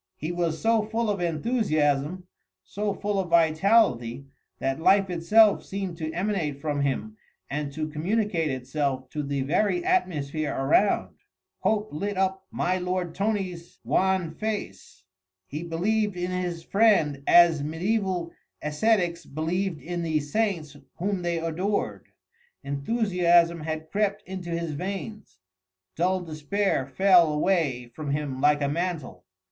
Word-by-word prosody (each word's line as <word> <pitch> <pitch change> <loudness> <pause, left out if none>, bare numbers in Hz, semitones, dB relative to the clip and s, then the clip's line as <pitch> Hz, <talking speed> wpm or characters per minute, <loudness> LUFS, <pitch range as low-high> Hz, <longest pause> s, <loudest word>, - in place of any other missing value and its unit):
He 155 +3 -4
was 170 -2 -1
so 225 0 +3
full 220 +1 -1
of 200 -3 -3
enthusiasm, 165 - 0 0.4
so 205 +1 -3
full 205 0 -2
of 185 -2 -2
vitality, 160 - +3 0.3
that 135 +2 -2
life 195 +3 +4
itself 205 +5 +4
seemed 190 -3 -4
to 160 -1 -3
emanate 175 -5 -2
from 145 -1 -2
him 140 +11 -2 0.3
and 145 0 -2
to 155 0 -3
communicate 170 +1 0
itself 130 0 -2
to 150 - -3
the 140 -1 -2
very 210 - +1
atmosphere 155 - 0
around. 150 +9 +2 0.4
Hope 215 -3 0
lit 200 +6 -3
up 190 0 -1
my 185 +1 0
lord 180 -1 -2
Tony's 185 -4 -3
wan 185 -4 +1
face: 165 - -5 0.4
he 150 +10 -6
believed 195 +4 0
in 180 +1 -2
his 175 -2 -3
friend 185 -9 +3
as 170 -4 +6
mediæval 175 +2 -1 0.3
ascetics 175 +2 +1
believed 165 +3 -2
in 175 0 -3
the 160 -2 0
saints 155 -1 -1 0.2
whom 195 +1 -2
they 175 -1 -1
adored. 165 +5 -2 0.6
Enthusiasm 170 +2 +2
had 155 0 -5
crept 205 0 0
into 185 -2 -6
his 170 -1 -2
veins, 195 - -6 0.6
dull 185 +3 +1
despair 160 -1 -1
fell 175 +2 +5
away 150 -7 0
from 155 0 -5
him 140 -2 -2
like 145 0 +3
a - - +2
mantle. 150 - -3
170 Hz, 130 wpm, -26 LUFS, 150-195 Hz, 0.6 s, as